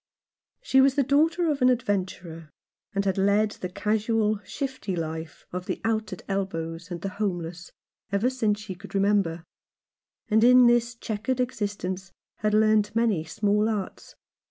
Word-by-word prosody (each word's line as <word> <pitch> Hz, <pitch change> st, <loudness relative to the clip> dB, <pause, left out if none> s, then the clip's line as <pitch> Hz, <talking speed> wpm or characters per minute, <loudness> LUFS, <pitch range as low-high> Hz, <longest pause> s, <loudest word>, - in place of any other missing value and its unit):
She 265 Hz, -, +4 dB
was 270 Hz, 0 st, +4 dB
the 285 Hz, -, +3 dB
daughter 320 Hz, +6 st, +2 dB
of 285 Hz, -2 st, -3 dB
an 250 Hz, -, +6 dB
adventurer, 185 Hz, -9 st, -2 dB, 0.5 s
and 200 Hz, 0 st, 0 dB
had 195 Hz, 0 st, 0 dB
led 205 Hz, +2 st, +3 dB
the 180 Hz, -, -6 dB
casual, 215 Hz, +2 st, 0 dB
shifty 260 Hz, -4 st, -4 dB
life 160 Hz, -1 st, -5 dB
of 180 Hz, 0 st, -5 dB
the -, -, -2 dB
out 220 Hz, -1 st, -1 dB
at 185 Hz, -, -7 dB
elbows 170 Hz, -3 st, -3 dB
and 175 Hz, -1 st, -5 dB
the 195 Hz, -, -3 dB
homeless 175 Hz, -3 st, -3 dB, 0.4 s
ever 200 Hz, +4 st, +2 dB
since 220 Hz, -5 st, 0 dB
she 210 Hz, -2 st, -6 dB
could 185 Hz, -, -11 dB
remember; 195 Hz, -4 st, +1 dB, 0.8 s
and 220 Hz, +1 st, +3 dB
in 250 Hz, +1 st, +7 dB
this 240 Hz, 0 st, +3 dB
chequered 225 Hz, +3 st, -3 dB
existence 200 Hz, -6 st, -3 dB, 0.3 s
had 210 Hz, 0 st, +1 dB
learnt 215 Hz, 0 st, +3 dB
many 225 Hz, -8 st, +2 dB
small 210 Hz, +6 st, +1 dB
arts. 205 Hz, -4 st, -5 dB
210 Hz, 155 wpm, -26 LUFS, 185-230 Hz, 0.8 s, in